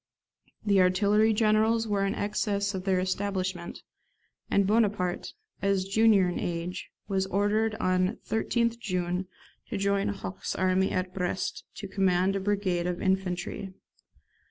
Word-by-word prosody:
The 200 -2 +4
artillery 205 +4 +4
generals 220 +1 +2
were 200 -2 +1
in 195 - -1
excess 205 0 -1
of 185 -1 -5
their 190 -2 +2
establishment, 185 -2 -3 0.7
and 200 - +3
Bonaparte, 205 -4 +1 0.3
as 195 -1 +1
junior 200 -1 +4
in 175 - -2
age, 175 +1 -4 0.2
was 190 -1 0
ordered 210 +3 +1
on 185 0 +1
13th 235 +1 0
June 180 -3 -2 0.4
to - - -2
join 200 0 +1
Hoche's 95 - -4
army 185 +1 +2
at 185 0 -2
Brest 180 0 -3
to 200 - -6
command 190 0 +2
a - - 0
brigade 190 -3 0
of 180 0 -2
infantry. 190 0 -2
195 Hz, 130 wpm, -28 LUFS, 185-205 Hz, 0.7 s, The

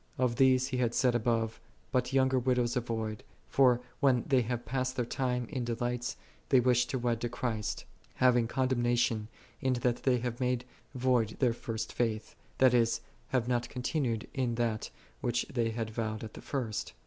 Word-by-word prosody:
"3 130 - +3
Of 120 -2 -1
these 130 0 +4
he 130 - -2
had 120 -2 +1
said 125 -2 +3
above, 115 -1 0
'" - - -34
But 125 -2 +1
younger 130 -1 +3
widows 125 -1 +1
avoid; 110 -3 -2 0.2
for 125 -3 +4 0.2
when 130 -5 +3
they 130 -3 +3
have 120 +1 -3
past 130 0 -1
their 125 - 0
time 125 0 -1
in 130 -5 -2
delights, 120 +1 -2 0.3
they 130 - +6
wish 125 0 +3
to 130 - -2
wed 120 -2 -1
in 120 - 0
Christ; 115 -3 -3 0.3
having 125 -2 +4
condemna 120 -1 +1
tion, 110 -2 +1 0.3
in 130 -1 +2
that 120 -1 0
they 130 -2 +3
have 120 0 -3
made 125 -1 0 0.3
void 125 -4 +1
their 125 -4 +3
first 115 -1 -4
faith:" 110 -3 -1 0.2
that 130 -1 +5
is, 115 -1 +3 0.3
have 125 -3 0
not 120 -1 0
continued 125 -3 -1
in 130 -4 0
that, 115 -2 -1 0.3
which 120 -1 0
they 115 -3 +1
had 115 -1 -3
vowed 110 -1 -3
at 110 - -7
the - - -9
first. 120 -6 -3
120 Hz, 185 wpm, -31 LUFS, 115-130 Hz, 0.3 s, they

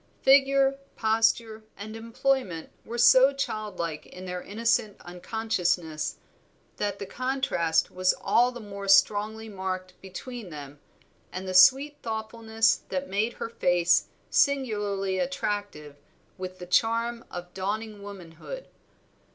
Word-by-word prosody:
Figure, 275 0 +5 0.2
posture, 220 0 +1 0.2
and 215 +2 -7
employment 230 -6 -1
were 235 - -6
so 260 +3 +7
childlike 205 - -4
in 185 +1 -10
their 180 0 -4
innocent 230 +1 0
unconsciousness, 175 -5 -2 0.6
that 205 -1 -2
the 200 - -6
contrast 220 -9 0
was 185 0 +2
all 245 +1 +3
the 245 - -9
more 200 -2 -8
strongly 210 +3 +3
marked 185 -2 -4
between 205 +3 -8
them 145 -2 -9 0.5
and 185 +1 -6
the 185 - -3
sweet 270 +10 +6
thoughtfulness 225 0 0
that 185 0 -3
made 210 +5 0
her - - -5
face 175 -6 +2 0.2
singularly 205 -8 +1
attractive 205 - -3 0.4
with 185 0 -7
the 180 - -8
charm 230 +5 +1
of 175 0 -8
dawning 210 +2 -4
womanhood. 200 - -9
205 Hz, 120 wpm, -27 LUFS, 185-230 Hz, 0.6 s, so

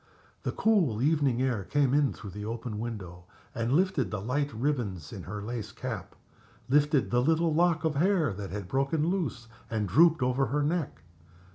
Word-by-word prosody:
The - - -2
cool 180 - +2
evening 140 -3 +2
air 120 -7 0
came 140 +4 +1
in 145 -1 +3
through 100 - -9
the 105 +2 -7
open 115 0 -4
window 95 -7 -6 0.3
and 115 +1 -1
lifted 160 - +2
the 105 - -3
light 140 +7 -1
ribbons 110 - -2
in 100 - -6
her 100 +2 -6
lace 115 -1 -5
cap, 110 -8 -6 0.5
lifted 145 +1 +3
the 120 0 +3
little 160 +3 +2
lock 170 0 +2
of 160 -1 +1
hair 170 - +2
that 100 0 -6
had 100 -2 -5
broken 140 - 0
loose 155 - -2 0.2
and 110 -3 -1
drooped 155 - +5
over 130 +2 +1
her 145 +1 0
neck. 155 - -2
130 Hz, 175 wpm, -29 LUFS, 105-150 Hz, 0.5 s, drooped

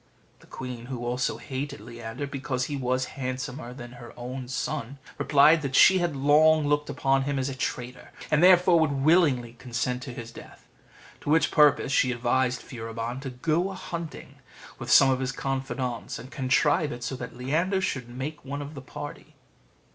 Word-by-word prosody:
The - - -20
queen, 125 -2 -7
who 125 -2 -5
also 125 +1 -1
hated 140 +1 -5
Leander, 115 +4 -7
because 135 -2 -3
he 145 - -4
was 130 -1 0 0.2
handsomer 130 0 -4
than 120 -1 -9
her 120 -1 -11 0.4
son, 125 0 -3 0.2
replied 150 +3 +5
that 135 -2 -3
she 190 0 +7
had 175 -4 -1
long 150 +3 +4
looked 145 0 +1
upon 135 0 +1
him 140 0 -1
as 135 +1 -1
a - - -4
traitor, 125 -1 -5 0.2
and 150 0 +4
therefore 180 -1 +6
would 160 -2 +2
willingly 140 -8 +3
consent 125 0 -2
to 130 - -7
his 120 -1 -8
death. - - -14 0.5
To - - -6
which 160 +2 +3
purpose 150 -3 +4
she 130 -2 +3
advised 125 +1 0
Furibon 115 +1 -5
to 135 - -5
go 160 +8 0
a 195 - -6
hunting 170 -3 -7 0.4
with - - -6
some 135 -1 +7
of 130 - 0
his 130 0 -1
confidants, 135 -3 -3
and 125 +4 -10
contrive 145 +3 +2
it 120 0 -7
so 125 +3 -3
that 120 - -8
Leander 165 +10 0
should 130 -9 -3
make 135 +5 -6
one 140 +1 -5
of 145 +2 -9
the 140 - -8
party. 145 +3 -9
135 Hz, 180 wpm, -27 LUFS, 125-150 Hz, 0.5 s, she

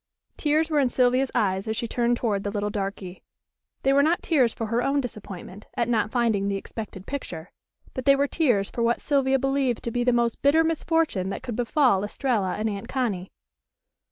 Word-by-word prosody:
Tears 310 +2 +1
were 300 - +3
in 265 -3 +3
Sylvia's 255 +2 +2
eyes 190 -1 +1
as 220 0 -1
she 235 - -2
turned 240 +1 +1
toward 205 -5 -1
the 205 - -2
little 205 0 -2
darky. 195 -2 -5 0.6
They 270 - +3
were 280 - +5
not 320 +4 +2
tears 265 -8 +3
for 225 - -4
her 230 +2 0
own 275 +3 +1
disappointment 205 -5 -7
at 235 - +1
not 225 -2 +1
finding 225 -5 +1
the 200 - 0
expected 195 -1 -7
picture, 180 - -6 0.4
but 260 - -5
they 275 -1 +6
were 280 +1 +1
tears 245 - +1
for 235 - -3
what 235 +1 +2
Sylvia 270 -2 +2
believed 270 -2 0
to 235 - -3
be 245 +1 0
the 250 - +3
most 235 -1 0
bitter 300 +4 +4
misfortune 325 - 0
that 195 - -5
could 245 -4 -4
befall 245 -4 +2
Estralla 210 -3 -1
and 215 +1 -1
Aunt 200 -2 -4
Connie. 210 -9 -2
240 Hz, 200 wpm, -25 LUFS, 205-270 Hz, 0.6 s, they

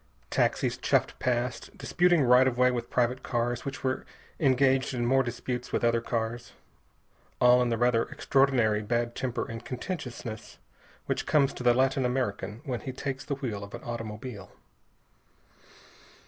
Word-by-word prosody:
Taxis - - +1
chuffed - - +2
past, 120 -1 -2
disputing 175 -3 +3
right 125 +1 +6
of 125 -2 -1
way 125 0 +4
with 120 -1 -3
private 125 +1 +1
cars 120 0 -1
which 135 -1 -6
were 130 -1 -1 0.4
engaged 135 -1 +3
in 120 -1 -1
more 135 +2 +4
disputes 125 0 -4
with - - -1
other 115 0 +3
cars, 115 0 -3 0.9
all 125 0 +6
in 125 - +1
the 115 - 0
rather 120 -1 +2
extraordinary 130 -6 +2
bad 120 +2 -1
temper 125 -2 -2
and 115 0 -7
contentiousness 125 - -6 0.5
which - - -2
comes 140 -3 +3
to - - -8
the 120 -1 +4
Latin 135 +1 +2
American 125 -4 -2
when 125 -4 -2
he 130 - -5
takes 135 +1 -4
the 140 - -3
wheel 115 -7 -4
of 100 - -8
an - - -10
automobile. 115 -2 -6
125 Hz, 155 wpm, -28 LUFS, 120-130 Hz, 0.9 s, right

